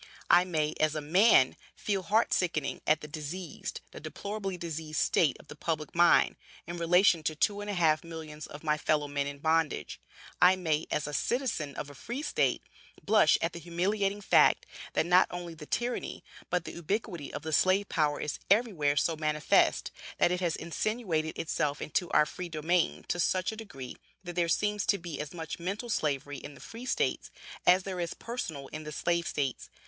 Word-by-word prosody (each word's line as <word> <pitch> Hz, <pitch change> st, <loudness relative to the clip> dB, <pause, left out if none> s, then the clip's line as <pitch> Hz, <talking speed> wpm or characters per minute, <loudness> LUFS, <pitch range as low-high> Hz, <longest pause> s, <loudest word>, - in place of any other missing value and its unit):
I 180 Hz, -, +7 dB
may, 155 Hz, -4 st, 0 dB
as 155 Hz, 0 st, +2 dB
a -, -, 0 dB
man, 160 Hz, -, +5 dB, 0.2 s
feel 200 Hz, -2 st, -1 dB
heart 215 Hz, +5 st, +2 dB
sickened 165 Hz, -6 st, -1 dB
at 155 Hz, 0 st, +3 dB
the 150 Hz, -, -7 dB
diseased, 155 Hz, +2 st, -6 dB
the -, -, -9 dB
deplorably 200 Hz, -2 st, -5 dB
diseased 160 Hz, -2 st, -4 dB
state 155 Hz, -6 st, +2 dB
of -, -, -16 dB
the -, -, -10 dB
public 155 Hz, -1 st, -3 dB
mind, 175 Hz, 0 st, +5 dB, 0.3 s
in 170 Hz, +1 st, -6 dB
relation 175 Hz, +1 st, +4 dB
to 155 Hz, 0 st, -2 dB
two 205 Hz, +6 st, +1 dB
and 205 Hz, -, -5 dB
a 205 Hz, -, -2 dB
half 160 Hz, -3 st, +3 dB
millions 160 Hz, -2 st, -8 dB
of 145 Hz, -, -10 dB
my 150 Hz, -1 st, +1 dB
fellow 150 Hz, -1 st, +1 dB
men 140 Hz, 0 st, -1 dB
in 145 Hz, 0 st, -6 dB
bondage. 160 Hz, 0 st, 0 dB, 0.4 s
I 180 Hz, +1 st, +7 dB
may, 160 Hz, -4 st, -1 dB
as 150 Hz, -, -1 dB
a 150 Hz, -, -5 dB
citizen 215 Hz, -, -1 dB
of 145 Hz, -, -6 dB
a -, -, -12 dB
Free 240 Hz, -, -5 dB
state, -, -, +1 dB, 0.4 s
blush 210 Hz, -6 st, +5 dB
at 165 Hz, -, 0 dB
the 170 Hz, -, -6 dB
humiliating 195 Hz, +4 st, -1 dB
fact, -, -, +4 dB, 0.3 s
that -, -, +2 dB
not 180 Hz, +2 st, +5 dB
only 175 Hz, -1 st, -6 dB
the 155 Hz, -2 st, -11 dB
tyranny, 240 Hz, 0 st, -2 dB, 0.3 s
but 180 Hz, -2 st, 0 dB
the -, -, -6 dB
ubiquity 175 Hz, -2 st, -3 dB
of -, -, -6 dB
the 160 Hz, 0 st, -4 dB
slave 190 Hz, +6 st, +3 dB
power 150 Hz, -2 st, +1 dB
is 150 Hz, -, -3 dB
everywhere 195 Hz, -9 st, +3 dB
so 165 Hz, +4 st, +2 dB
manifest; 150 Hz, -1 st, +2 dB, 0.3 s
that 175 Hz, -, +3 dB
it 180 Hz, -, 0 dB
has 175 Hz, -3 st, 0 dB
insinuated 170 Hz, -3 st, -2 dB
itself 150 Hz, -2 st, -1 dB
into 170 Hz, +4 st, -1 dB
our 150 Hz, -, +5 dB
free 175 Hz, +3 st, -6 dB
domain 160 Hz, +2 st, 0 dB
to 175 Hz, -, -1 dB
such 185 Hz, +2 st, +1 dB
a -, -, -7 dB
degree 165 Hz, -, -8 dB, 0.3 s
that 175 Hz, -1 st, -6 dB
there 170 Hz, -1 st, +1 dB
seems 210 Hz, +2 st, +1 dB
to 200 Hz, -, +3 dB
be 170 Hz, -4 st, -7 dB
as 150 Hz, -, -6 dB
much 165 Hz, -2 st, -6 dB
mental 200 Hz, +7 st, -4 dB
Slavery 145 Hz, -4 st, -1 dB
in 145 Hz, -, -10 dB
the -, -, -14 dB
Free 235 Hz, +2 st, -9 dB
states, -, -, 0 dB, 0.4 s
as 185 Hz, +1 st, +6 dB
there 185 Hz, -1 st, -4 dB
is 170 Hz, -2 st, -3 dB
personal 170 Hz, -, -5 dB
in 155 Hz, 0 st, -7 dB
the 150 Hz, -, -7 dB
Slave 170 Hz, +2 st, 0 dB
states. 135 Hz, -3 st, -2 dB
170 Hz, 195 wpm, -30 LUFS, 150-185 Hz, 0.4 s, I